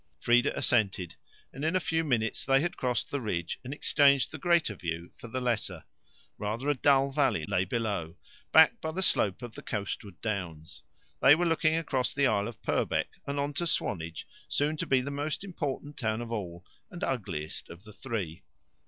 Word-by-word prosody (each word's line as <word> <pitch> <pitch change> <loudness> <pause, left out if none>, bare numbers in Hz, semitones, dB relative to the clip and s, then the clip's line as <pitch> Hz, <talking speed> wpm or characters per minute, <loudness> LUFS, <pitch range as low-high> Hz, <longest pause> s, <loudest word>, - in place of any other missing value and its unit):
Frieda 120 +3 +3
assented, 95 -8 +1 0.4
and 135 - -7
in 160 +3 +1
a - - +4
few 165 -1 0
minutes 115 -7 0
they 135 0 +4
had 175 +4 -1
crossed 125 -2 -1
the 140 - -1
ridge 85 -7 -2
and 130 - -6
exchanged 140 -1 +3
the - - -7
greater 170 - +3
view 85 -2 -5
for - - -10
the 130 +3 -3
lesser. 120 -4 -1 0.6
Rather 110 +7 -2
a - - +4
dull 135 0 +3
valley 130 - +1
lay 90 +4 +1
below, 100 -6 -2 0.3
backed 160 +9 +6
by 160 - -2
the 190 +4 -1
slope 100 - +2
of 120 -2 -7
the - - -9
coastward 100 -2 -5
downs. 90 -7 -5 0.4
They 135 - +8
were 175 +2 0
looking 160 -1 +2
across 135 -6 -1
the 140 0 +3
Isle 100 -4 +2
of 120 -4 -10
Purbeck - - 0 0.2
and 140 0 -2
on 145 +1 -1
to 170 +4 -1
Swanage, 85 - -1 0.2
soon 150 +2 +1
to - - -3
be 130 -1 +3
the 140 +2 -4
most 145 +5 -2
important 150 -6 -4
town 110 -2 -1
of 120 -1 -6
all, 90 -5 -5 0.2
and 175 - -7
ugliest 95 - -3
of 85 +3 -11
the 105 -1 -13
three. 100 - -4
125 Hz, 190 wpm, -29 LUFS, 100-145 Hz, 0.6 s, They